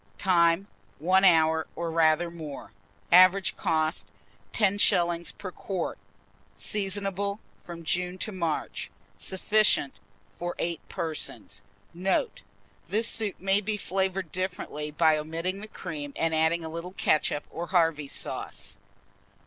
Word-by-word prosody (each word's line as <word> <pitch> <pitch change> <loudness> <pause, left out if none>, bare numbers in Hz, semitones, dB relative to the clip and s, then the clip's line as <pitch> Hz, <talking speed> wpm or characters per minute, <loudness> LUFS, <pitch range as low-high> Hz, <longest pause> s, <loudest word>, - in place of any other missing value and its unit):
Time. 170 0 +3 0.3
1 185 +5 +3
hour, 160 -3 +5
or 170 -1 -3
rather 165 +1 +3
more. 155 -4 -8 0.4
Average 185 +1 +6
cost, 160 0 0 0.4
10d. 175 -5 +3
per 185 - -6
quart. 185 -1 -4 0.6
Seasonable 200 - -1 0.2
from 170 -1 -9
June 180 +3 0
to 215 - -2
March. 170 -5 -3 0.3
Sufficient 205 -6 +2 0.5
for 175 0 -3
8 170 -1 -1
persons. 165 -4 -3 0.3
Note. 190 - 0 0.5
This 225 +2 +2
soup 215 -4 -1
may 195 +2 +2
be 210 +1 -2
flavoured 190 -3 -1
differently 180 -5 -3
by 155 0 +3
omitting 165 +5 -3
the 215 - -7
cream, 150 -8 -6
and 165 0 0
adding 160 +1 +2
a - - -4
little 170 +3 -6
ketchup 150 -4 +1
or 170 +1 -5
Harvey's 165 -6 +1
sauce. - - -4
175 Hz, 120 wpm, -28 LUFS, 160-190 Hz, 0.6 s, Average